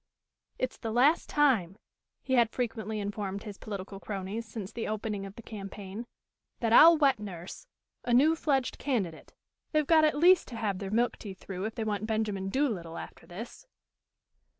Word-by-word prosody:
"It's 255 Hz, -, -2 dB
the 225 Hz, -, -4 dB
last 270 Hz, +8 st, +3 dB
time," 225 Hz, -, +2 dB, 0.5 s
he 260 Hz, -, -2 dB
had 235 Hz, -3 st, +5 dB
frequently 220 Hz, -3 st, -3 dB
informed 200 Hz, -1 st, -4 dB
his 205 Hz, -2 st, -8 dB
political 195 Hz, -1 st, -6 dB
cronies 200 Hz, +3 st, -5 dB
since 215 Hz, -2 st, -6 dB
the 230 Hz, -, -4 dB
opening 210 Hz, -2 st, -3 dB
of 195 Hz, -, -12 dB
the 230 Hz, -, -11 dB
campaign, 200 Hz, +1 st, -7 dB, 0.5 s
"that 230 Hz, -1 st, +1 dB
I'll 330 Hz, +6 st, +9 dB
wet 275 Hz, -5 st, +3 dB
nurse 195 Hz, -, -8 dB, 0.4 s
a 245 Hz, -, -2 dB
new 290 Hz, +7 st, +5 dB
fledged 275 Hz, -5 st, 0 dB
candidate. 200 Hz, -, -3 dB, 0.4 s
They've 305 Hz, -1 st, +3 dB
got 315 Hz, +1 st, +5 dB
at 305 Hz, -2 st, +3 dB
least 355 Hz, +3 st, +6 dB
to 240 Hz, -, -8 dB
have 205 Hz, -4 st, -2 dB
their 195 Hz, -2 st, -4 dB
milk 235 Hz, +4 st, +1 dB
teeth 195 Hz, -3 st, -8 dB
through 190 Hz, 0 st, -5 dB
if 220 Hz, -, -4 dB
they 225 Hz, -, -2 dB
want 215 Hz, -1 st, -2 dB
Benjamin 210 Hz, -3 st, -1 dB
Doolittle 195 Hz, -, -1 dB
after -, -, -9 dB
this." 225 Hz, -, -9 dB
220 Hz, 175 wpm, -30 LUFS, 195-255 Hz, 0.5 s, I'll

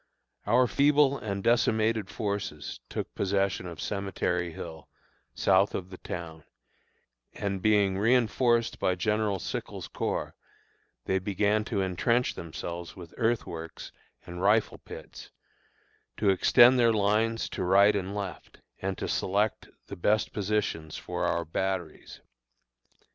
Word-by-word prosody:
Our 125 Hz, +4 st, +5 dB
feeble 140 Hz, +1 st, +3 dB
and 100 Hz, -3 st, -4 dB
decimated 110 Hz, -3 st, +2 dB
forces 100 Hz, -, -4 dB
took -, -, -5 dB
possession 100 Hz, -1 st, 0 dB
of 85 Hz, -3 st, -8 dB
Cemetery 90 Hz, -3 st, -2 dB
Hill, 80 Hz, 0 st, -9 dB, 0.5 s
south -, -, +3 dB
of 95 Hz, +1 st, -5 dB
the 95 Hz, -, -9 dB
town, 80 Hz, -2 st, -7 dB, 0.9 s
and 100 Hz, -2 st, -3 dB
being 100 Hz, -2 st, +3 dB
reënforced 120 Hz, +1 st, +2 dB
by 90 Hz, -, +1 dB
General 105 Hz, +1 st, 0 dB
Sickles' -, -, -5 dB
Corps, -, -, -3 dB, 0.7 s
they 95 Hz, -, +1 dB
began 105 Hz, +2 st, +1 dB
to 105 Hz, -4 st, -1 dB
intrench 115 Hz, +7 st, +1 dB
themselves 85 Hz, +1 st, -7 dB
with 85 Hz, -3 st, -11 dB
earthworks 105 Hz, -8 st, -3 dB, 0.3 s
and 90 Hz, 0 st, -7 dB
rifle 105 Hz, +3 st, +2 dB
pits, -, -, -11 dB, 0.9 s
to 100 Hz, -, +3 dB
extend 120 Hz, +6 st, +6 dB
their 115 Hz, -1 st, +5 dB
lines 110 Hz, +2 st, +1 dB
to -, -, -4 dB
right 100 Hz, +3 st, +5 dB
and 100 Hz, 0 st, -3 dB
left, 100 Hz, -3 st, -6 dB, 0.2 s
and 95 Hz, 0 st, -2 dB
to -, -, -3 dB
select 100 Hz, +3 st, 0 dB, 0.2 s
the -, -, -8 dB
best 105 Hz, +5 st, +1 dB
positions 100 Hz, -6 st, -2 dB
for -, -, -3 dB
our 85 Hz, 0 st, 0 dB
batteries. 95 Hz, +2 st, -4 dB
100 Hz, 125 wpm, -28 LUFS, 90-110 Hz, 0.9 s, extend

